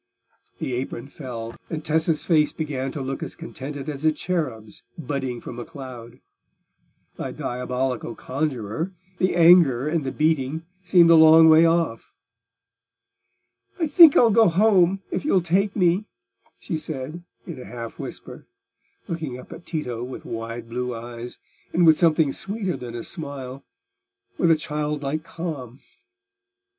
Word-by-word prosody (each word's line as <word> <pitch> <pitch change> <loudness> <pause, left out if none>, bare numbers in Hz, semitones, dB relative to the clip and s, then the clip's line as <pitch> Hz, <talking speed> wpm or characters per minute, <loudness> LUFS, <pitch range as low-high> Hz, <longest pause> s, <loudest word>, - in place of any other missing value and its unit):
The 130 - -4
apron 125 +1 -4
fell, 115 -6 -7
and 155 -2 -5
Tessa's 160 0 +1
face 150 -4 +3
began 135 -4 -3
to 140 - -4
look 135 +1 -4
as - - -5
contented 145 -3 -7
as 145 -1 -5
a 155 - +4
cherub's 130 - -4 0.2
budding 135 -5 -3
from 120 0 -8
a - - -4
cloud. 125 -2 -10 1.0
The - - -4
diabolical 125 -1 -3
conjuror, 135 - -3 0.3
the 185 -1 +1
anger 165 -7 +6
and 155 0 0
the 130 - -3
beating, 155 0 0 0.2
seemed 175 -2 +5
a - - +8
long 160 0 +8
way 160 +1 +7
off. 165 -8 -1 1.6
"I 330 - +2
think 310 0 +8
I'll 230 -2 +6
go 225 +1 +5
home, 190 0 +3
if - - -2
you'll 285 -10 +3
take 190 +4 0
me," 185 +1 +2 0.5
she 160 -4 -4
said, 155 +2 -6 0.2
in 160 -8 -8
a - - -10
half 115 -1 -8
whisper, - - -9 0.6
looking 155 -7 -4
up 130 - -11
at 165 +1 -13
Tito 125 -8 -4
with 125 +1 -8
wide 115 +1 -6
blue 125 +1 -3
eyes, 120 +1 -8 0.4
and 175 0 +4
with 160 -1 +6
something 160 -4 +3
sweeter 195 +2 -3
than 120 -1 -8
a 120 - -5
smile—with 170 - -6
a 165 - +6
childlike 150 0 -3
calm. 145 -8 -6
150 Hz, 145 wpm, -23 LUFS, 125-170 Hz, 1.6 s, a